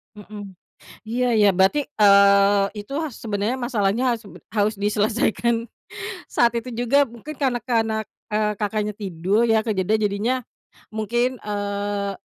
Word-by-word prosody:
Mhm. 205 Hz, -2 st, -10 dB, 0.5 s
Iya, 240 Hz, +3 st, -1 dB
ya, 210 Hz, -, +5 dB
berarti, 190 Hz, +11 st, +3 dB
eee, 200 Hz, -3 st, +5 dB, 0.2 s
itu 240 Hz, +7 st, -10 dB, 0.2 s
sebenarnya 215 Hz, +3 st, -2 dB
masalahnya, 230 Hz, -1 st, 0 dB
harus 225 Hz, -, -19 dB, 0.3 s
harus 210 Hz, +1 st, +1 dB
diselesaikan 220 Hz, +3 st, 0 dB, 0.6 s
saat 235 Hz, 0 st, +3 dB
itu 235 Hz, +2 st, -3 dB
juga 245 Hz, +4 st, +2 dB
mungkin 240 Hz, +6 st, -9 dB
karena 265 Hz, -4 st, 0 dB
karena, 225 Hz, -3 st, +1 dB, 0.3 s
eee, 210 Hz, 0 st, 0 dB
Kakaknya 210 Hz, 0 st, -2 dB
tidur 195 Hz, +1 st, -1 dB
ya, 220 Hz, 0 st, +3 dB
kejadiannya 210 Hz, 0 st, +1 dB
jadinya 210 Hz, +5 st, 0 dB, 0.6 s
mungkin, 240 Hz, +4 st, -1 dB
eee, 205 Hz, -1 st, -3 dB
215 Hz, 120 wpm, -22 LUFS, 205-235 Hz, 0.6 s, ya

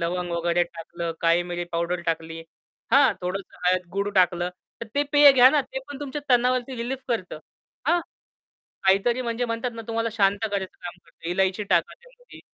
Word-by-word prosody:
लवंग 175 Hz, +1 st, -2 dB
वगैरे 170 Hz, +1 st, +1 dB
टाकलं, 170 Hz, 0 st, -6 dB
काळीमिरी 175 Hz, +1 st, +1 dB
पावडर 170 Hz, +1 st, -1 dB
टाकली 165 Hz, 0 st, -3 dB, 0.5 s
हां, 275 Hz, 0 st, +6 dB
थोडंसं 185 Hz, +2 st, -5 dB
हळद, 180 Hz, 0 st, +2 dB
गुळ 200 Hz, +1 st, -1 dB
टाकलं, 180 Hz, -1 st, +3 dB, 0.3 s
तर 230 Hz, -, -5 dB
ते 285 Hz, -, +3 dB
पेय 290 Hz, -1 st, +9 dB
घ्या 255 Hz, -1 st, +8 dB
ना, 295 Hz, 0 st, +3 dB
ते 265 Hz, 0 st, -6 dB
पण 285 Hz, -1 st, -8 dB
तुमच्या 290 Hz, 0 st, -5 dB
तणावावरती 250 Hz, +1 st, +2 dB
रिलीफ 245 Hz, +3 st, -3 dB
करतं. 185 Hz, -9 st, -3 dB, 0.5 s
हां? 345 Hz, +3 st, +3 dB, 0.8 s
काहीतरी 215 Hz, +6 st, +3 dB
म्हणजे 235 Hz, +1 st, -2 dB
म्हणतात 230 Hz, +1 st, -2 dB
ना 230 Hz, -, -7 dB
तुम्हाला 230 Hz, 0 st, -1 dB
शांत 200 Hz, -2 st, +2 dB
करायचं 195 Hz, -2 st, -1 dB, 0.2 s
काम 175 Hz, -, -5 dB
करतं. 165 Hz, -, -11 dB
इलायची 190 Hz, +2 st, +1 dB
टाका 175 Hz, -4 st, +1 dB
त्यामध्ये. -, -, -18 dB
200 Hz, 170 wpm, -25 LUFS, 175-250 Hz, 0.8 s, पेय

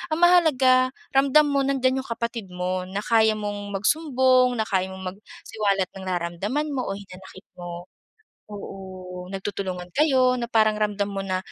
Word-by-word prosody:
Ang 330 Hz, -, -4 dB
mahalaga, 265 Hz, -8 st, +5 dB, 0.2 s
ramdam 275 Hz, +3 st, +5 dB
mo 280 Hz, -1 st, +2 dB
nandyan 265 Hz, -1 st, +1 dB
yung 265 Hz, -, -7 dB
kapatid 230 Hz, -3 st, -4 dB
mo. 180 Hz, 0 st, -3 dB
Na 195 Hz, +2 st, -4 dB
kaya 220 Hz, -1 st, +3 dB
mong 205 Hz, -1 st, -5 dB
magsumbong. 255 Hz, +1 st, +3 dB
Na 220 Hz, -, 0 dB
kaya 190 Hz, -3 st, 0 dB
mong 190 Hz, 0 st, -9 dB
magsiwalat 200 Hz, -1 st, -3 dB
ng 195 Hz, -, -9 dB
nararamdaman 185 Hz, -, -2 dB
mo 260 Hz, -2 st, -2 dB
o 195 Hz, -, -2 dB
hinanakit 190 Hz, -1 st, -12 dB, 0.2 s
mo. 175 Hz, 0 st, -7 dB, 0.7 s
Oo, 185 Hz, -2 st, -8 dB
nagtutulungan 190 Hz, -2 st, -5 dB
kayo 260 Hz, -4 st, +3 dB
na 240 Hz, -1 st, -4 dB
parang 215 Hz, -2 st, +4 dB
ramdam 210 Hz, -1 st, -1 dB
mo 195 Hz, 0 st, -3 dB
na 185 Hz, -1 st, -1 dB
210 Hz, 155 wpm, -24 LUFS, 190-255 Hz, 0.7 s, mahalaga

